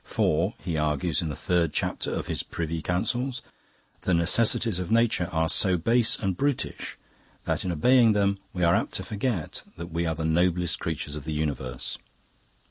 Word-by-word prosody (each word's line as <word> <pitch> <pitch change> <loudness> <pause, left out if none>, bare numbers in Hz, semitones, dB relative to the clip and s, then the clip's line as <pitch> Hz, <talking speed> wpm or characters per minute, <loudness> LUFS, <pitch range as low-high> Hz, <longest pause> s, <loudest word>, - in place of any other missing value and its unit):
For, 85 +8 0
he 85 -4 -3
argues 75 +1 0
in 80 - -3
the 75 - -4
third 85 -2 0
chapter - - -1
of - - -3
his - - 0
'Priuy 80 0 -4
Counsels', 120 +8 -1 0.6
the 95 - +1
necessities 100 +3 +3
of 90 - -4
nature 110 -6 +2
are 80 0 +1
so 90 +2 +2
base 115 +6 +3
and 95 -3 -1
brutish 140 +5 -2 0.5
that - - -1
in 90 - -1
obeying 115 +7 +5
them 100 -1 +1
we 90 - -2
are 85 0 +5
apt - - 0
to - - 0
forget 105 -5 -3 0.2
that 85 0 -7
we 85 +1 -1
are 80 - -1
the 80 +1 -3
noblest 85 +1 +1
creatures 75 -2 -4
of 75 - -6
the 80 - -3
universe. 70 -5 -3
90 Hz, 180 wpm, -26 LUFS, 80-105 Hz, 0.6 s, obeying